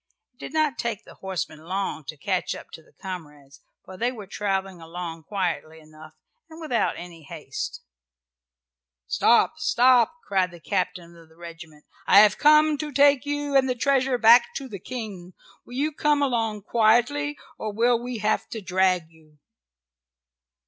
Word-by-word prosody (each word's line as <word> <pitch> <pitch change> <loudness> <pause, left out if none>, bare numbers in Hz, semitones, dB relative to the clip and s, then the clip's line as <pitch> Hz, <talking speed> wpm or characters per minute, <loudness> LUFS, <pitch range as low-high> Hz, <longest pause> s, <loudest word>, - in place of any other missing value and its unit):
It 245 - -44
did - - -8
not 305 -5 +1
take 230 -4 -3
the - - -14
horsemen 190 -5 -5
long 185 0 -4
to 155 +3 -8
catch 185 +4 -2
up - - -12
to - - -10
the - - -26
comrades 150 -7 -9 0.2
for 185 - -11
they 240 +4 0
were 220 -5 -9
traveling 195 -2 -3
along 165 -1 -7
quietly 170 -5 -3
enough, 155 0 -15 0.4
and 320 0 -12
without 305 -8 0
any 175 -2 -10
haste. 140 - -7 1.2
"Stop! 235 - +3
stop!" 255 -3 +4
cried 190 -2 +1
the 175 0 -13
captain 170 0 -3
of 165 -1 -17
the 160 - -22
regiment. 165 -3 -12 0.2
"I 200 - +8
have 210 -1 +4
come 305 0 +5
to 305 -1 -4
take 285 0 +4
you 290 -1 -2
and 265 -1 +4
the 250 - 0
treasure 265 0 +1
back 235 +1 +6
to 275 - -5
the 205 -6 -8
King. 200 -5 -8 0.3
Will 245 - -11
you 295 +4 0
come 295 -1 +1
along 225 -6 -1
quietly, 240 +7 +2 0.2
or 215 - -3
will 235 +2 +2
we 245 0 -5
have 215 0 -1
to 225 - -5
drag 185 -3 +1
you?" 155 -2 -23
210 Hz, 165 wpm, -25 LUFS, 175-255 Hz, 1.2 s, I